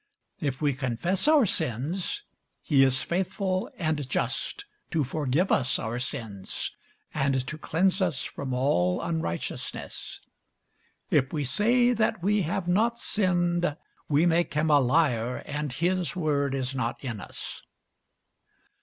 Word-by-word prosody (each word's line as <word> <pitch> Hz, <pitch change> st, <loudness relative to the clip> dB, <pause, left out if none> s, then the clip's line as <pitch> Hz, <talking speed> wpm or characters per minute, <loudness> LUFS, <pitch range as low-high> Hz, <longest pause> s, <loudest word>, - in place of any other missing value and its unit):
If 135 Hz, -2 st, -2 dB
we 145 Hz, -1 st, +3 dB
confess 140 Hz, -, -1 dB
our 305 Hz, -5 st, +6 dB
sins, 165 Hz, -, -1 dB, 0.4 s
he 140 Hz, -4 st, +5 dB
is 130 Hz, 0 st, +3 dB
faithful 185 Hz, +1 st, -1 dB
and 155 Hz, -5 st, -1 dB
just -, -, -2 dB, 0.2 s
to 155 Hz, -, +1 dB
forgive 145 Hz, +5 st, 0 dB
us 130 Hz, -1 st, +3 dB
our 115 Hz, +1 st, -3 dB
sins, 115 Hz, -7 st, -3 dB, 0.4 s
and 135 Hz, -2 st, +1 dB
to 150 Hz, -, -5 dB
cleanse 185 Hz, +5 st, +1 dB
us 175 Hz, -7 st, 0 dB
from 135 Hz, -2 st, -5 dB
all 110 Hz, -9 st, +2 dB
unrighteousness. 160 Hz, -, -4 dB, 0.9 s
If 135 Hz, -2 st, +3 dB
we 150 Hz, -3 st, -1 dB
say 240 Hz, -, +3 dB
that 220 Hz, -4 st, 0 dB
we 205 Hz, +2 st, +3 dB
have 175 Hz, +2 st, -2 dB
not 225 Hz, +6 st, +2 dB
sinned, 175 Hz, -7 st, +1 dB, 0.3 s
we 150 Hz, +3 st, +4 dB
make 170 Hz, -2 st, +2 dB
him 155 Hz, +1 st, +2 dB
a 145 Hz, -, +7 dB
liar, 125 Hz, -3 st, +2 dB
and 150 Hz, -1 st, -3 dB
his 180 Hz, +6 st, 0 dB
word 145 Hz, -5 st, +1 dB
is 130 Hz, 0 st, -1 dB
not 125 Hz, -3 st, -2 dB
in 120 Hz, -5 st, -4 dB
us. -, -, -6 dB
150 Hz, 135 wpm, -27 LUFS, 130-180 Hz, 0.9 s, a